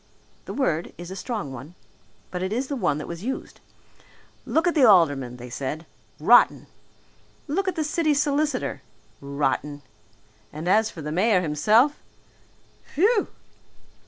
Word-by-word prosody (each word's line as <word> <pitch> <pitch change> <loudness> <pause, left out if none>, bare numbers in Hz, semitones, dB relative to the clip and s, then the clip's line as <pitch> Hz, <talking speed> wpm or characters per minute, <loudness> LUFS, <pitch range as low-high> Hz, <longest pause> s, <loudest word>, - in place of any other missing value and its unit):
The - - -6
word 170 - -1
is 175 +1 -8
a - - -6
strong 195 - -4
one. 135 +7 -10 0.6
But 180 - -4
it 190 +1 -2
is 255 +4 -2
the 285 - -2
one 150 - 0
that 150 - -6
was 170 +2 -7
used. 265 +3 -5 0.9
Look 320 - +1
at 345 - +2
the 295 - +3
aldermen, 145 - +4
they 125 0 -10
said 145 +6 -4 0.3
rotten! - - +5 0.8
Look 380 +7 -1
at 375 - 0
the 315 - -1
city 305 0 +1
solicitor, 290 -1 0 0.4
rotten! 140 +1 -2 0.7
And 155 +3 -6
as 215 +4 +3
for 160 - -9
the 150 - -4
mayor 185 +3 +3
himself 215 - +3 0.8
phew! 405 +7 +2
190 Hz, 145 wpm, -24 LUFS, -, 0.9 s, rotten